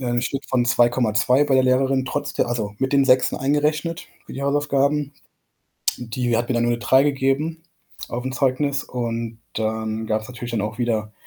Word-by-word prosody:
äh, - - -5
'n 120 0 0
Schnitt 135 0 -3
von 125 -2 +2
2,2 120 +1 +3
bei 140 -2 +1
der 130 0 +4
Lehrerin, 130 +1 +2
trotz - - -3
der - - +1
also, 110 -4 -2
mit 135 +1 -1
den 140 -1 +4
6en 130 -1 +3
eingerechnet 150 +4 0 0.2
für - - -10
die 135 - -5
Hausaufgaben. 145 0 +1 0.8
Die 120 0 -2
hat 120 +1 -2
mir - - +1
dann 120 - +2
nur 120 0 +2
'ne - - -2
3 130 +3 +4
gegeben 145 +3 0 0.5
aufm 125 +2 -3
Zeugnis 140 +2 0
und 115 -2 -4
dann 110 0 -2
gab's 110 0 -1
natürlich 120 -1 -7
dann 115 -3 -1
auch 110 +3 -4
wieder 110 -3 -1
130 Hz, 185 wpm, -22 LUFS, 115-140 Hz, 0.8 s, der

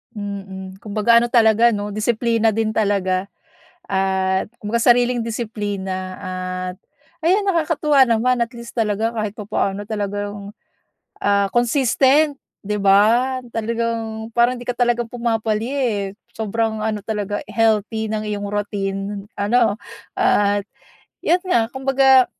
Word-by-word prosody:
Mhm, 195 -2 -7
kumbaga 220 +2 +3
ano 240 - -1
talaga 230 -1 +5
'no 205 -2 -3
disiplina 225 +1 +1
din 220 0 -1
talaga, 195 -3 0 0.6
at 190 -1 +1 0.2
kumbaga 215 +3 0
sariling 245 0 +3
disiplina 205 -5 -4
at, 185 -1 -4 0.5
ayan 380 +5 +4
nakakatuwa 310 -7 +3
naman 240 +2 +2
at 235 0 -2
least 235 0 -9
talaga 220 0 +1
kahit 215 -3 -3
papaano 205 -2 -2
talagang 205 -1 -4 0.7
ah 200 0 +3
consistent, 270 +4 +3 0.2
'di 210 +1 -3
ba 215 +6 +3 0.2
talagang 225 -1 -2
parang 240 +1 +3
hindi 245 - -10
ka 245 - -1
talaga 240 -1 +1
pumapalya 230 +1 -1
eh. 230 -6 0 0.3
Sobrang 220 0 -1
ano 215 -1 -1
talaga 205 -2 -2
healthy 220 -1 +1
ng 215 -1 -2
iyong 205 -1 -3
routine 200 -1 -3
ano 220 +1 +2 0.4
at, 205 0 +2 0.6
iyun 355 +1 +2
nga 235 -10 +2
kumbaga 265 -1 +4
220 Hz, 120 wpm, -20 LUFS, 205-235 Hz, 0.7 s, talaga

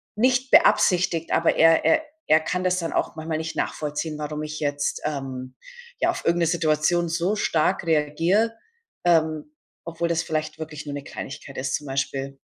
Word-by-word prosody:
nicht 255 +3 +2
beabsichtigt, 180 -5 +4
aber 165 - +3
er 165 0 +5
er 320 -1 +4 0.2
er 155 - +6
kann 180 +3 -2
das 185 0 +1
dann 165 -1 -3
auch - - -1
manchmal 155 0 -3
nicht 160 0 -5
nachvollziehen, 150 +1 -3
warum 150 0 -4
ich 155 0 -5
jetzt, 145 -1 -1
ähm, 130 -3 -5 0.4
ja - - +2
auf - - -7
irgend 170 +1 +2
'ne 170 - +3
Situation 165 +1 +1
so 175 +5 0
stark 185 -1 +1
reagiere, 165 +8 +2 0.5
ähm, 160 -2 +2 0.4
obwohl 170 0 -2
das 165 -1 0
vielleicht 155 0 -3
wirklich 155 -1 -7
nur 145 - -4
'ne 140 - -6
Kleinigkeit 135 0 -8
ist 135 +1 -1
zum 150 - -5
Beispiel. 135 0 -3
160 Hz, 175 wpm, -24 LUFS, 150-175 Hz, 0.5 s, er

